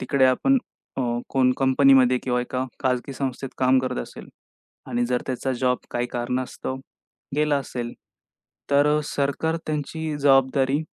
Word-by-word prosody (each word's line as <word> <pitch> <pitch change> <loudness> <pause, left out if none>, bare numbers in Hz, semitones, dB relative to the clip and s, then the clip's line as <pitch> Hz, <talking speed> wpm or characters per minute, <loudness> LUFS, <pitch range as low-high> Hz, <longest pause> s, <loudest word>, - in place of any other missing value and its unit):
तिकडे 140 -2 +2
आपण 265 - +3 0.4
अ, - - -1 0.3
कोण 130 -1 +3
कंपनीमध्ये 130 -1 +5
किंवा 125 -1 +1
एका 125 +1 -2 0.2
खाजगी 130 +1 -1
संस्थेत 130 0 -4
काम 130 0 +4
करत 130 0 -3
असेल - - -11 0.6
आणि 120 0 0
जर 125 0 -1
त्याचा 130 0 -2
जॉब 125 -1 +2
काही 120 0 -1
कारणास्तव 125 +2 -3 0.6
गेला 150 -1 +2
असेल, 120 -3 -4 0.8
तर 140 +1 +4
अ, - - +1
सरकार 145 +3 -1
त्यांची 155 +1 -3
जबाबदारी 135 0 +3
130 Hz, 135 wpm, -24 LUFS, 125-140 Hz, 0.8 s, कंपनीमध्ये